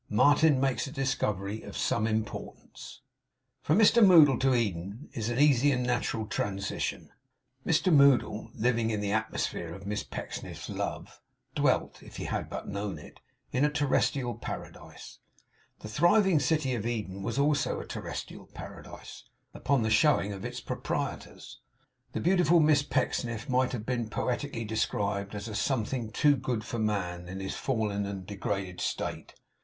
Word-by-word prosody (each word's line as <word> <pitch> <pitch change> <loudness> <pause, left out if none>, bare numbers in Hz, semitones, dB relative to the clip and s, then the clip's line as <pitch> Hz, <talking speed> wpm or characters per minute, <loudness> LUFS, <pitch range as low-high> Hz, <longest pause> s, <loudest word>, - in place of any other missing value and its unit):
MARTIN 145 +6 +4
MAKES 135 +1 0
A - - -7
DISCOVERY 110 -7 -1
OF - - -8
SOME 110 -1 +1
IMPORTANCE 110 -1 -5 0.6
From 155 - +2
Mr 225 +1 +6
Moddle 155 - +7
to 130 -1 +3
Eden 100 - -3
is 110 -1 -2
an 120 - -2
easy 145 -1 +5
and 125 -2 0
natural 120 -2 -1
transition. 100 -1 -3 0.5
Mr 170 +2 +2
Moddle, 135 -6 +4
living 115 -1 +1
in 110 -2 -1
the 100 -1 -2
atmosphere 105 -5 -2
of 95 +1 -11
Miss 105 0 -2
Pecksniff's - - -7
love, - - -5 0.3
dwelt - - +1
(if - - -12
he - - -4
had - - -3
but - - -6
known 100 -3 -4
it) 75 - -13 0.3
in 125 - +1
a 150 - +4
terrestrial 140 -3 +1
Paradise. - - -9 0.6
The - - -7
thriving 175 - +4
city 145 -2 +1
of 115 -2 -2
Eden 105 -5 -3
was 95 - -3
also 145 0 +1
a - - -7
terrestrial - - -7
Paradise, - - -10 0.3
upon 135 -2 +1
the 110 - 0
showing 110 -3 +3
of 95 - -8
its - - -5
proprietors. - - -5 0.5
The - - -2
beautiful 175 -2 +4
Miss 150 -2 +5
Pecksniff 120 -5 -2
might 130 0 +2
have 110 -4 -4
been 120 -3 -2
poetically 125 +1 -2
described 100 -2 -1
as 105 +1 -5
a 110 - -6
something 115 0 -1
too 145 +5 +3
good 120 -3 -2
for 120 - -4
man 90 -5 -2
in 95 +2 -6
his 95 0 -4
fallen 105 -5 -1
and 95 -2 -6
degraded 95 -2 -4
state. - - -4
115 Hz, 155 wpm, -29 LUFS, 105-140 Hz, 0.6 s, Moddle